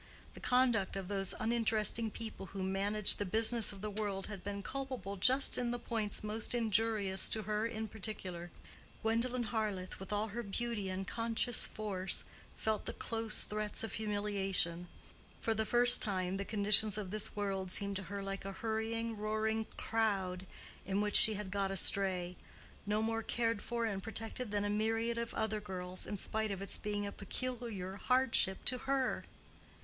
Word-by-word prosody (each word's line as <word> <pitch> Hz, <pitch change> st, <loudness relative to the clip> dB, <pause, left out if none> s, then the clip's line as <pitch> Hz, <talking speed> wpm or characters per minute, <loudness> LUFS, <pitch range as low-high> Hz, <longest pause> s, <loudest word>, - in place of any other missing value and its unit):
The -, -, -11 dB
conduct 245 Hz, -7 st, +2 dB
of 195 Hz, -1 st, -4 dB
those 195 Hz, -2 st, 0 dB
uninteresting 225 Hz, -1 st, +1 dB
people 220 Hz, -3 st, -7 dB
who 195 Hz, +1 st, -5 dB
managed 200 Hz, +2 st, +2 dB
the -, -, +1 dB
business 225 Hz, +3 st, +2 dB
of 200 Hz, -2 st, -10 dB
the 210 Hz, 0 st, -3 dB
world 200 Hz, -2 st, -2 dB
had 200 Hz, -4 st, -7 dB
been 200 Hz, 0 st, -4 dB
culpable 260 Hz, -8 st, -4 dB
just 260 Hz, +8 st, +6 dB
in 245 Hz, -1 st, 0 dB
the 245 Hz, -, -1 dB
points 220 Hz, -4 st, -3 dB
most 215 Hz, +3 st, -2 dB
injurious 215 Hz, -4 st, +1 dB
to 220 Hz, -, -1 dB
her 215 Hz, +2 st, 0 dB
in 220 Hz, -1 st, -4 dB
particular. 185 Hz, -5 st, -6 dB, 0.5 s
Gwendolen 240 Hz, +3 st, +1 dB
Harleth, 210 Hz, -5 st, -3 dB
with 190 Hz, +1 st, -8 dB
all 210 Hz, +1 st, 0 dB
her 235 Hz, +4 st, -4 dB
beauty 215 Hz, -1 st, -2 dB
and 190 Hz, +1 st, -4 dB
conscious 230 Hz, +1 st, 0 dB
force, 195 Hz, -3 st, -1 dB, 0.3 s
felt 220 Hz, -1 st, -1 dB
the -, -, -2 dB
close 225 Hz, -2 st, -1 dB
threats 210 Hz, 0 st, -2 dB
of 225 Hz, -, -4 dB
humiliation: 195 Hz, -5 st, -1 dB, 0.5 s
for 225 Hz, -, 0 dB
the 220 Hz, 0 st, -1 dB
first 245 Hz, 0 st, +7 dB
time 185 Hz, -3 st, +1 dB
the 200 Hz, -, -3 dB
conditions 210 Hz, 0 st, +7 dB
of 200 Hz, -3 st, -4 dB
this 215 Hz, 0 st, -2 dB
world 195 Hz, -2 st, -2 dB
seemed 200 Hz, +1 st, -1 dB
to 195 Hz, -, -5 dB
her 200 Hz, 0 st, -4 dB
like 195 Hz, 0 st, -4 dB
a 195 Hz, 0 st, -5 dB
hurrying 225 Hz, +2 st, -2 dB
roaring 220 Hz, +1 st, -1 dB
crowd 195 Hz, -5 st, -1 dB, 0.4 s
in 195 Hz, +1 st, -1 dB
which 210 Hz, 0 st, 0 dB
she 215 Hz, -, +6 dB
had 200 Hz, -2 st, -5 dB
got 200 Hz, -1 st, 0 dB
astray, 185 Hz, -1 st, +2 dB, 0.5 s
no 210 Hz, +1 st, +1 dB
more 225 Hz, 0 st, 0 dB
cared 230 Hz, -2 st, 0 dB
for 235 Hz, -1 st, -2 dB
and 200 Hz, -3 st, -2 dB
protected 225 Hz, +2 st, -4 dB
than 205 Hz, 0 st, 0 dB
a -, -, +1 dB
myriad 225 Hz, +2 st, 0 dB
of 235 Hz, 0 st, -3 dB
other 220 Hz, -1 st, 0 dB
girls, 185 Hz, -2 st, -5 dB
in 205 Hz, -, -3 dB
spite 220 Hz, +2 st, -1 dB
of 195 Hz, -2 st, -3 dB
its 195 Hz, -, -3 dB
being 205 Hz, -1 st, -2 dB
a 200 Hz, -, -4 dB
peculiar 210 Hz, -4 st, -4 dB
hardship 250 Hz, -6 st, +2 dB
to 255 Hz, 0 st, +3 dB
her. 270 Hz, -2 st, +1 dB
210 Hz, 175 wpm, -35 LUFS, 195-225 Hz, 0.5 s, first